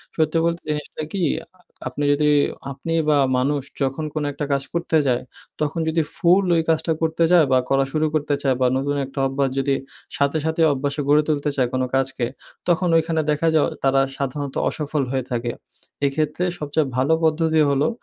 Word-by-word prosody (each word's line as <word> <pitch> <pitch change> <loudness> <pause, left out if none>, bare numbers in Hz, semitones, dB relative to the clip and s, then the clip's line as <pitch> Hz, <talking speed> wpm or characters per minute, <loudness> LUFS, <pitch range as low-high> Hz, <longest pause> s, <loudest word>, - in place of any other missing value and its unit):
সত্যি 155 0 +1
বলতে 170 0 -1
জিনিসটা 150 +1 -4
কি 195 - -2 0.2
আ - - -20 0.4
আপনি 130 +3 -4
যদি 150 +1 +2 0.4
আপনি 165 +5 -4 0.2
বা 150 - +4 0.2
মানুষ 140 +3 +1 0.2
যখন 135 +3 -1
কোন 155 - -2
একটা 145 - -4
কাজ 140 0 0
করতে 170 -1 +1
যায় 125 -1 +1 0.4
তখন 150 +2 -1
যদি 160 +1 +2
ফুল 180 +3 +4
ওই 165 - +3
কাজটা 160 +1 +1
করতে 160 +1 +1
যায় 175 -3 +6
বা 130 - +5
করা 135 0 +3
শুরু 155 +1 +1
করতে 150 -1 0
চায় 135 -2 +2
বা 130 - +5
নতুন 140 +2 -1
একটা 135 +1 -7
অভ্যাস 135 0 0
যদি 135 0 +1 0.4
সাথে, 140 +2 +1
সাথে 160 +1 0
অভ্যাসে 140 +2 -2
গড়ে 150 +1 +5
তুলতে 150 -1 0
চায়, 130 -3 +2
কোন 130 - 0
কাজকে 135 -2 0 0.4
তখন 180 +1 +2
ঐখানে 160 0 +1
দেখা 150 +2 0
যায় 155 - +4
অ - - -2
তারা 135 0 +4 0.2
সাধারণত 140 0 -3
অসফল 150 -1 -2
হয়ে 135 -1 -1
থাকে। 120 0 -1 0.5
এক্ষেত্রে 150 +4 -1 0.2
সবচেয়ে 150 0 0
ভালো 135 +5 +3
পদ্ধতি 160 0 +2
হলো 140 +1 +2
150 Hz, 185 wpm, -22 LUFS, 135-160 Hz, 0.5 s, যায়